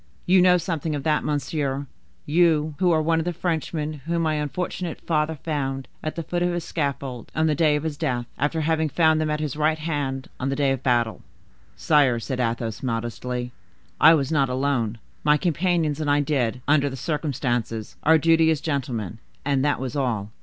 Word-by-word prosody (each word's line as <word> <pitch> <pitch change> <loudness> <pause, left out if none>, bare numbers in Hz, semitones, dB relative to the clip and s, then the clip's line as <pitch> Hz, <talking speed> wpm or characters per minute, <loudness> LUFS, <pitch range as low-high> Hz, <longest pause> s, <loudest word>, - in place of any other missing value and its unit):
You 185 +1 +5
know 180 0 +6
something 165 -3 -2
of 140 - -4
that, 155 0 +1
monsieur,—you, 150 +2 -1
who 180 -2 +3
are 160 -1 +3
one 165 +1 +2
of - - 0
the 175 - 0
Frenchmen 155 -3 -3
whom 170 0 0
my 160 -1 +1
unfortunate 165 +3 -3
father 155 -1 0
found 135 -3 -3
at 155 - -4
the 165 - -3
foot 175 +2 -2
of 175 0 +2
his 175 -1 -2
scaffold, 140 -6 -3
on 160 - +2
the 155 - +3
day 150 0 +3
of 150 - -2
his 155 -3 -3
death, 120 -3 -1
after 160 +2 0
having 160 0 +1
found 160 0 +3
them 155 - 0
at 150 0 -1
his 150 -3 -3
right 155 +1 +1
hand 145 -4 -3
on 135 - -1
the 135 - -1
day 140 -1 +2
of 135 -1 -2
battle." 120 -4 +1 0.5
"Sire," 135 - +3
said 130 +2 -4
Athos 115 -2 -2
modestly, 125 +1 -3 0.5
"I 160 +1 +8
was 140 -2 -1
not 140 -4 +2
alone. 125 -4 0 0.3
My 150 0 +4
companions 165 -2 0
and 150 - -1
I 145 0 +4
did, 125 -4 -1
under 145 -1 +3
the 135 - -6
circumstances, 120 -7 -2
our 160 +1 +5
duty 165 +1 +4
as 160 -2 +2
gentlemen, 125 - -3 0.3
and 140 -2 +1
that 145 0 +1
was 130 +1 -4
all. 115 -7 -1
150 Hz, 195 wpm, -24 LUFS, 130-160 Hz, 0.5 s, I